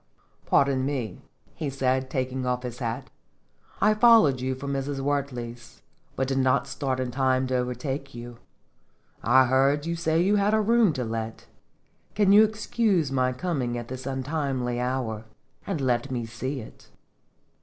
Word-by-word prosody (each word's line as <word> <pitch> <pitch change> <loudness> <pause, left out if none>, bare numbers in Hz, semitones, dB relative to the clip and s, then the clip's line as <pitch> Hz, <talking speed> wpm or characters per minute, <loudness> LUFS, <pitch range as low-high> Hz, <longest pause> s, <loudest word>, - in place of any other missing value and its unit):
" - - -38
Pardon 135 -2 +3
me," 130 -8 -3 0.3
he 155 -3 -4
said, 130 -1 0
taking 130 0 -2
off 125 0 -1
his 125 -1 -6
hat; 125 +2 -4 0.3
" - - -42 0.3
1 215 0 +2
followed 220 - +6
you 130 0 -1
from 140 +1 -4
Mrs. 135 0 -3
Wertley's, 125 -4 -4 0.3
but 130 - -1
did 135 0 0
not 130 -1 +2
start 130 -2 -3
in 130 -1 -2
time 130 0 +1
to 130 0 -1
overtake 130 +3 -3
you. 120 0 -9 0.8
I 130 0 +5
heard 135 +4 +2
you 170 0 -1
say 165 -1 +1
you 200 +4 +3
had 205 +2 +2
a - - +3
room 225 -2 +4
to 130 -3 -2
let. 110 0 -5 0.7
Can 205 -2 +4
you 210 +2 +8
excuse 215 - 0
my 130 -1 +1
coming 130 -5 -2
at 120 0 -6
this 130 +1 -6
untimely 135 -3 -2
hour, 125 -4 -2 0.4
and 195 -6 -2
let 125 0 0
me 120 -3 -3
see 130 +4 -4
it?" 110 - -14
130 Hz, 165 wpm, -26 LUFS, 125-145 Hz, 0.8 s, you